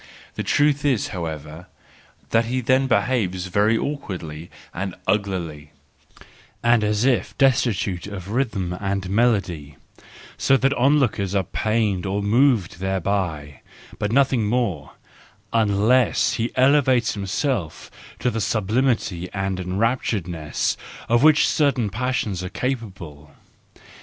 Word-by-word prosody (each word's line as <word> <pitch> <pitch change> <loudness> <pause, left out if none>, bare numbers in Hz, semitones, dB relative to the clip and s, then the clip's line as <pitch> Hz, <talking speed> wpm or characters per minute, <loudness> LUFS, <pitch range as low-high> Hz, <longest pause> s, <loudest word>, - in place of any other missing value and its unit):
The - - -4
truth 145 -1 +2
is, 130 -8 +1
however, 80 -1 -6 0.6
that 115 0 +3
he 125 +3 -1
then 130 +2 +2
behaves 100 -6 0
very 105 +5 +2
awkwardly 90 - -5 0.2
and 95 0 -4
uglily, 90 -7 -2 0.9
and 120 -2 +4
as 105 +2 +1
if 130 -3 +1
destitute 110 - +1
of 100 -2 -7
rhythm 110 -8 -1
and 100 -1 -2
melody; 95 - 0 0.6
so 135 - +4
that 135 +1 +2
onlookers 125 -8 +1
are 95 - +2
pained 105 -1 -1
or 100 +1 -1
moved 110 -5 +2
thereby, 95 -6 -2 0.4
but 105 - -1
nothing 130 -4 +2
more 105 - -1 0.6
—unless 110 +3 +3
he 115 +1 -1
elevate 130 -3 +3
himself 100 - -3 0.3
to 125 - 0
the 115 - -2
sublimity 105 -3 0
and 95 -1 -2
enrapturedness 95 - -1 0.3
of 120 +1 +4
which 155 0 +5
certain 135 -8 +1
passions 110 -5 -2
are 90 - -4
capable. 95 - -5
105 Hz, 115 wpm, -22 LUFS, 90-125 Hz, 0.9 s, which